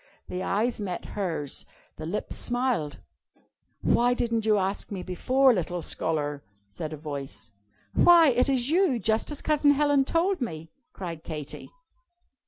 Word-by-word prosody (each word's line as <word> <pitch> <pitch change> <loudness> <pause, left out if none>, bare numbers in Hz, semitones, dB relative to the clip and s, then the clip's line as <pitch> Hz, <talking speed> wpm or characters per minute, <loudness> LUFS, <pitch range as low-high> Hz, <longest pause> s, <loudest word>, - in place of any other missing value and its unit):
The 180 - -3
eyes 220 +4 0
met 180 -4 -4
hers. 165 -8 -2 0.3
The 155 - -6
lips 205 +5 -3
smiled. 245 - -1 0.8
"Why 245 +1 +3
didn't 230 -2 -1
you 215 -1 +5
ask 195 +1 -1
me 190 -3 -4
before, 255 +9 +3
Little 175 -3 -2
Scholar?" 145 -3 -2 0.3
said 125 +10 -6
a 155 - -5
voice. 135 -8 -7 0.4
"Why, 340 -3 +7
it 250 +2 +2
is 260 0 +1
You, 345 -7 +3
just 220 +1 0
as 295 - -5
Cousin 295 -1 +4
Helen 290 -1 +3
told 345 +5 +1
me!" 160 -8 -5 0.2
cried 170 - -7
Katy. 150 -3 -6
210 Hz, 145 wpm, -27 LUFS, 160-260 Hz, 0.8 s, Why